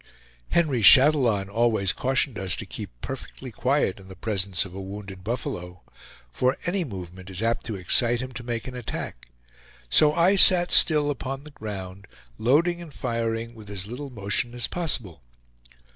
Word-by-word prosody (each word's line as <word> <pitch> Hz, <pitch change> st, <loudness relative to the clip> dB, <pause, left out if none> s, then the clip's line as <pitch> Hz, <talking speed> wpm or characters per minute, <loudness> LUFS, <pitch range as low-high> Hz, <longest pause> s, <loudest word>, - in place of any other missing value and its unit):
Henry 150 Hz, -8 st, +1 dB
Chatillon 125 Hz, -4 st, +6 dB
always 110 Hz, -2 st, +1 dB
cautioned 130 Hz, -2 st, 0 dB
us 95 Hz, -3 st, -2 dB
to -, -, -6 dB
keep -, -, -7 dB
perfectly 130 Hz, -1 st, -8 dB
quiet 125 Hz, -4 st, 0 dB
in 95 Hz, -, -15 dB
the 95 Hz, -, -11 dB
presence 95 Hz, -1 st, -2 dB
of 95 Hz, -, -11 dB
a 95 Hz, -, -7 dB
wounded 95 Hz, -1 st, -9 dB
buffalo, 90 Hz, -6 st, -5 dB, 0.5 s
for 130 Hz, -, 0 dB
any 185 Hz, +1 st, 0 dB
movement 95 Hz, -, -9 dB
is 95 Hz, +3 st, -4 dB
apt 115 Hz, 0 st, -1 dB
to 110 Hz, -, -4 dB
excite 115 Hz, +6 st, +2 dB
him 130 Hz, 0 st, -5 dB
to 125 Hz, 0 st, -7 dB
make 120 Hz, -1 st, -4 dB
an 130 Hz, -, -7 dB
attack; 105 Hz, -, -6 dB, 0.6 s
so 150 Hz, -, +5 dB
I 185 Hz, +4 st, +4 dB
sat 180 Hz, -2 st, +7 dB
still 150 Hz, -2 st, +5 dB
upon 135 Hz, 0 st, -5 dB
the 150 Hz, -, -13 dB
ground, 100 Hz, -5 st, -8 dB, 0.3 s
loading 170 Hz, +9 st, +2 dB
and 165 Hz, -3 st, -10 dB
firing 115 Hz, -2 st, -3 dB
with 110 Hz, -3 st, -13 dB
as 100 Hz, -2 st, -5 dB
little 125 Hz, +6 st, -7 dB
motion 115 Hz, +1 st, -2 dB
as 120 Hz, -1 st, 0 dB
possible. 120 Hz, -, -3 dB
115 Hz, 165 wpm, -25 LUFS, 95-135 Hz, 0.6 s, sat